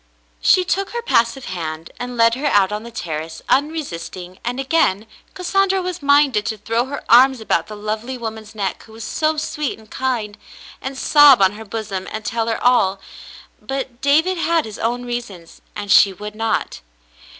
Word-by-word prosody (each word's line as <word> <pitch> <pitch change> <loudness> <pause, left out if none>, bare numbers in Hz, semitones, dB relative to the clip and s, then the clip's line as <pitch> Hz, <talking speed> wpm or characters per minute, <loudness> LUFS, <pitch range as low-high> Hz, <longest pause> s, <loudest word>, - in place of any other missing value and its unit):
She 370 - +4
took 390 +2 -1
her 475 - -2
passive 240 - +1
hand 165 -3 -5
and 245 0 -5
led 230 0 +5
her 275 +5 -1
out 200 -6 +3
on 210 0 -3
the 235 - -9
terrace 160 -7 -6
unresisting, 185 - -2
and 245 +2 -3
again 270 -8 +1 0.3
Cassandra 385 +1 +1
was 360 -2 -4
minded 285 -6 +4
to 220 - -2
throw 225 +3 -1
her 280 +2 -6
arms 255 +2 +6
about 170 -6 0
the 215 - -8
lovely 215 +5 -4
woman's 220 -2 -7
neck, 200 -3 -3
who 220 - -16
was 225 0 -9
so 310 +5 0
sweet 300 -2 -3
and 220 -1 -19
kind, 235 -6 -2 0.4
and 265 0 -5
sob 290 -3 +7
on 190 -1 +4
her 220 +2 -10
bosom 200 -3 -5
and 215 0 -6
tell 230 0 -1
her 225 - 0
all 200 -6 +3 0.3
— - - -15 0.3
but 265 -2 -5
David 320 +6 +2
had 335 -1 +1
his 215 -2 -9
own 245 +2 -1
reasons, 230 -9 -7
and 205 -1 -4
she 195 0 +6
would 210 +2 -8
not. 225 +1 -2
230 Hz, 185 wpm, -20 LUFS, 210-275 Hz, 0.4 s, sob